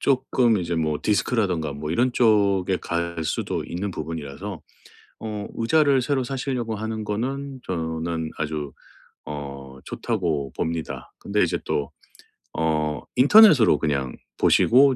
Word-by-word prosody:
조금 125 -4 +2
이제 85 -1 -2
뭐 75 -2 0
디스크라든가 100 - 0
뭐 75 +2 -5
이런 120 +8 +2
쪽에 100 -6 +3
갈 85 -1 -3
수도 - - -2
있는 95 +3 -4
부분이라서 80 +3 -6 0.6
어 105 -2 -5
의자를 140 +2 +3
새로 135 -1 0
사시려고 125 -3 -3
하는 110 +1 -4
거는 130 +6 -3
저는 80 -1 -3
아주 75 -2 -3 0.5
어 70 -2 -7
좋다고 75 -7 -2
봅니다. 80 -1 -4
근데 105 +1 0
이제 85 - +1
또 75 +1 -2 0.7
어 75 -2 0 0.2
인터넷으로 150 - +7
그냥 70 -5 -1 0.2
보시고 130 +2 +5
95 Hz, 270 characters per minute, -24 LUFS, 80-120 Hz, 0.7 s, 인터넷으로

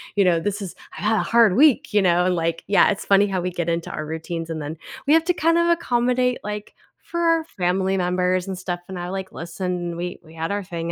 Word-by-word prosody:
you 200 -1 +4
know, 170 -2 +3
this 205 +4 -2
is 195 -4 -6 0.2
I - - -7
had 220 +1 +2
a - - +2
hard 230 -5 +4
week," 280 -5 +4
you 210 - +4
know? 180 -1 +3
And, 180 -1 +2
like 165 0 -1
yeah, 200 - +5
it's 200 - -2
funny 200 +1 +4
how 190 -2 -1
we 180 +1 -2
get 170 -1 -2
into 170 0 -2
our 155 - -4
routines 165 +1 -5
and 160 - -3
then 150 +2 -5 0.3
we 290 - +4
have 325 0 +5
to 360 - +2
kinda 340 +1 +3
accommodate, 250 -5 +1
like, 210 0 -6 0.3
for 340 - -5
our 330 -1 +3
family 190 - -1
members 180 0 0
and 190 -1 -4
stuff, 180 -1 -4
and 190 - -6
I, 175 - -4
like, 190 0 -5
listen, 175 0 -4
we 175 +1 -4
we 160 0 -16
had 165 +3 -3
our 205 -1 -2
thing 170 -2 -4
185 Hz, 245 wpm, -22 LUFS, 175-210 Hz, 0.3 s, yeah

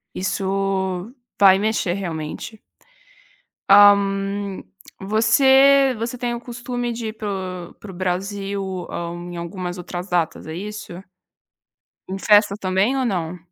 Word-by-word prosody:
isso 190 +1 -2 0.3
vai 195 -1 +7
mexer 215 -4 0
realmente. 175 +3 -6 1.1
Hã, 205 0 +9 1.1
você 265 +6 +5
você 235 +2 -4
tem 240 -1 -2
o 235 - -5
costume 240 0 -4
de 230 -1 -5
ir - - -4
para 215 -1 -5 0.4
o - - -19
para 205 - -12
o - - -10
Brasil, 190 +1 -3
hã, 170 0 -4 0.2
em 175 - -7
algumas 175 +1 -5
outras 180 +1 -6
datas 170 -3 -1
é 160 - -6
isso? 210 +2 -7 1.2
Em 190 - -3
festa 205 0 +4
também 190 +7 +1
ou 265 -1 0
não? 180 -5 -2
195 Hz, 130 wpm, -21 LUFS, 185-225 Hz, 1.2 s, Hã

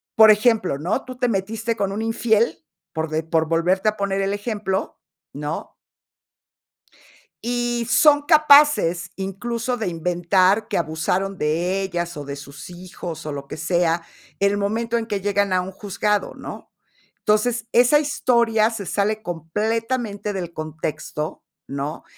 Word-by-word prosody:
por 220 0 +8
ejemplo, 215 - +3
¿no?, 180 - -2
tú 255 - -8
te 250 -1 +1
metiste 225 +3 -2
con 200 -1 -1
un 210 - -3
infiel, 225 0 +1 0.4
por 160 -1 -2
de 155 +1 -1
por 160 0 +1
volverte 180 +5 +1
a 215 - +3
poner 195 -1 -1
el 195 +1 0
ejemplo, 205 -2 -3 0.3
¿no? 150 +2 -5 1.7
Y 240 -1 -1
son 290 -1 +5
capaces, 290 - +5
incluso, 230 +6 -3
de 220 - -2
inventar 180 +5 +2
que - - -1
abusaron 175 +4 -1
de 175 +5 0
ellas, 175 -3 -3
o 145 - -5
de 140 0 -5
sus 140 0 -10
hijos, 175 -2 -8
o 150 - -4
lo 140 -1 -7
que - - -6
sea, 170 +1 +1 0.4
en 200 0 +4
el 205 - -1
momento 230 +3 0
en 225 - -4
que 205 -3 -3
llegan 200 -1 +1
a 180 - +2
un 185 - -6
juzgado, 205 +1 -1
¿no? - - -9 0.5
Entonces, 225 +2 +1
esa 250 +5 +6
historia 235 -6 +2
se 225 -4 -5
sale 210 +4 -1
completamente 210 +5 -2
del 175 -3 -4
contexto, 155 -1 -5 0.2
¿no? 140 +2 -5
200 Hz, 150 wpm, -22 LUFS, 170-225 Hz, 1.7 s, por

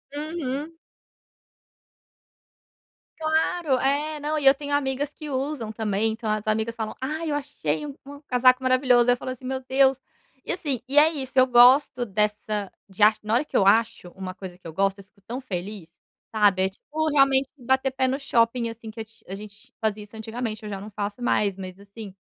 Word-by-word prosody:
Uhum. 300 -1 -4 2.5
Claro, 315 -2 +1
é, 295 +4 0
não 305 +1 -1
e 285 - -4
eu 270 +1 +8
tenho 285 +1 -5
amigas 285 0 -1
que 305 -2 -8
usam 265 -4 -3
também, 220 0 0
então 225 0 -5
as 215 0 -2
amigas 220 +1 0
falam: 220 -2 -5
"Ai 310 +4 -3
eu - - 0
achei 210 - -3
u 290 - -6
um 285 +1 -11
casaco 255 -2 +3
maravilhoso", 255 -2 +4
ai - - +7
eu - - -16
falo 255 - -5
assim: 255 0 -9
"Meu 260 +1 -3
Deus". 265 0 +3 0.5
E - - -1
assim, 290 -9 -3
e 275 +3 -2
é 300 +2 +8
isso 265 -4 -6
eu 255 - +7
gosto 250 +1 +5
dessa 210 -1 -2 0.2
de 195 +1 -1
ach 215 0 +5
na 215 +1 -2
hora 240 - +3
que 300 - -2
eu 195 - +4
acho 220 -3 +3
uma 185 0 -7
coisa 185 -1 -9
que 180 - -39
eu 165 - -6
gosto, 195 +4 0
eu - - -11
fico 200 +2 -31
tão 245 +3 -4
feliz, 195 -5 -6 0.4
sabe? 205 -3 +3
É 190 - +2
tipo 310 +10 -3
realmente 275 -1 +4
bater 265 +1 +1
pé 260 0 0
no 260 +1 0
shopping 235 -3 +1
assim 225 0 -9
que 225 +1 -7
é - - -3
a 220 -3 -13
a - - -3
gente 210 +5 -12
fazia 215 -1 -1
isso 210 +2 -14
antigamente, 220 0 -5
eu 210 - -6
já 200 -2 -5
não 205 +2 -9
faço 205 +2 -5
mais. 205 -5 +1
Mas 185 -1 -8
assim, 200 0 -11
245 Hz, 205 wpm, -25 LUFS, 210-275 Hz, 2.5 s, eu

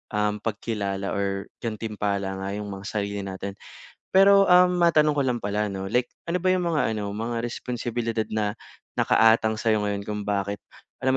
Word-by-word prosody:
uhm, 105 0 0
pagkilala 100 -3 -3
or 100 -1 -2
gantimpala 105 -3 -3
nga 95 0 -4
yung 105 -1 -5
mga 95 0 -8
sarili 100 -1 -2
natin. 95 +1 -5 0.6
Pero, 195 +1 +7
um, 180 0 +6
matanong 155 -3 +4
ko - - +4
lang 125 -2 0
pala 105 +1 0
'no, 95 0 -5
like 125 +1 +2 0.2
ano 180 - +1
ba 185 +1 +1
yung 180 -1 0
mga 150 -8 +1
ano, 105 -2 -3
mga 115 +3 -3
responsibilidad 120 -1 -3
na 105 -1 -1 0.4
nakaatang 110 -1 +4
sa'yo 110 -2 +2
ngayon 100 -1 -2
kung 105 0 -3
bakit, 100 0 -2 0.4
alam 130 0 +3
105 Hz, 165 wpm, -25 LUFS, 100-120 Hz, 0.6 s, Pero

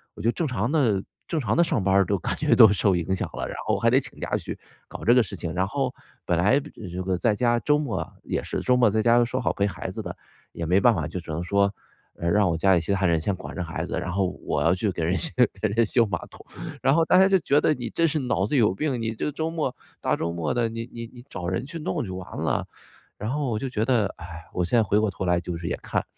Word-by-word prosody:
我 - - -8
就 115 +2 +2
正 165 - -2
常 115 -2 -1
的 115 -11 +2 0.2
正 165 - -2
常 110 -5 0
的 - - +6
上 125 - 0
班 95 0 +2
儿 100 -1 +5
都 100 +2 0
感 - - -2
觉 - - +3
都 110 - +9
受 100 -1 +2
影 90 +2 -1
响 - - -3
了， - - -3
然 - - -6
后 - - +2
还 - - +3
得 - - +5
请 - - -9
假 - - -1
去 - - -6 0.3
搞 - - -9
这 120 - +6
个 125 - +6
事 95 - -7
情。 85 -1 -5
然 95 +2 0
后 135 +1 -1 0.3
本 85 - +1
来 105 +10 +4
这 150 - -11
个 100 - -9
这 90 +2 -4
个 95 -1 0
在 105 +2 +2
家 120 +1 +2
周 150 +6 +2
末 120 - -3
也 - - -2
是 - - -3
周 125 - +3
末 120 -3 +5
在 110 +2 +1
家 120 +1 +5
说 125 +2 -2
好 - - +1
陪 100 0 +1
孩 95 - -5
子 110 - -5
的， 90 -4 -6 0.4
也 85 - -4
没 90 +4 +3
办 115 +3 +5
法， 80 -4 -2
就 90 - -5
只 80 - -8
能 75 - -2
说， 100 +2 +2 0.4
嗯， 85 - -2
让 100 0 +3
我 80 - 0
家 95 +3 +4
里 85 - +2
其 85 - -3
他 100 -1 +1
人 85 -2 +3
先 100 - 0
管 - - -9
着 90 - -2
孩 80 -1 -4
子， - - -3
然 - - -4
后 95 +1 +1 0.2
我 70 - -1
要 85 +4 +3
去 100 +2 0
给 85 - -3
人 90 - +1
修 165 - -2 0.3
给 110 - +2
人 115 +3 +2
修 115 +2 +3
马 90 -4 -1
桶。 - - -15 0.4
然 135 +1 +4
后 165 0 +3
大 180 - +4
家 190 +1 +6
就 190 - +4
觉 145 -3 +2
得 155 - +3
你 120 -2 -5
真 165 +8 +1
是 155 - 0
脑 125 -7 0
子 140 - 0
有 105 -6 +4
病， 135 +1 -1
你 115 0 -1
这 150 - -2
周 160 +3 -2
末 155 -6 -2 0.3
大 - - +1
周 85 - -2
末 85 -2 -1
的， 120 -2 +1
你 115 +1 -6
你 115 0 -6
你 120 -1 -12
找 85 - -5
人 95 +7 -2
去 160 +4 -7
弄 95 -9 -2
就 95 - -6
完 95 -1 -8
了。 - - 0 0.5
然 105 +2 -4
后 145 -2 -1
我 110 - -1
就 135 - -3
觉 110 -4 -1
得， 115 -5 +2
哎， 85 -1 -9
我 90 - 0
现 90 +7 +1
在 - - +4
回 105 0 +1
过 105 -2 +2
头 95 - -4
来 90 -1 +2
就 90 -1 -5
是 85 0 -5
也 - - -1
看。 - - -1
105 Hz, 320 characters per minute, -25 LUFS, 90-125 Hz, 0.5 s, 都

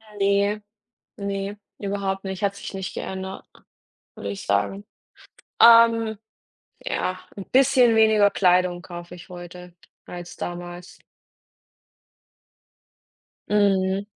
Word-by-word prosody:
Äh, 205 -1 0
ne, - - -36 0.5
ne, 200 0 -4 0.2
überhaupt 195 -1 -3
nicht, 190 +1 -5
hat 200 0 +1
sich - - -8
nicht 190 -1 -5
geändert, 190 0 -6 0.7
würde 100 - -6
ich 100 - -6
sagen. 100 - 0 0.8
Ähm, 230 -2 +6 0.7
ja, 185 - -2 0.2
'n 195 - -6
bisschen 255 -3 +5
weniger 220 -2 +5
Kleidung 180 -1 +2
kaufe 175 -1 -9
ich 175 - -14
heute, 175 0 -10 0.3
als 175 0 -8
damals. 175 0 -7 2.5
Mhm. 195 -1 +2
195 Hz, 100 wpm, -24 LUFS, 180-205 Hz, 2.5 s, Ähm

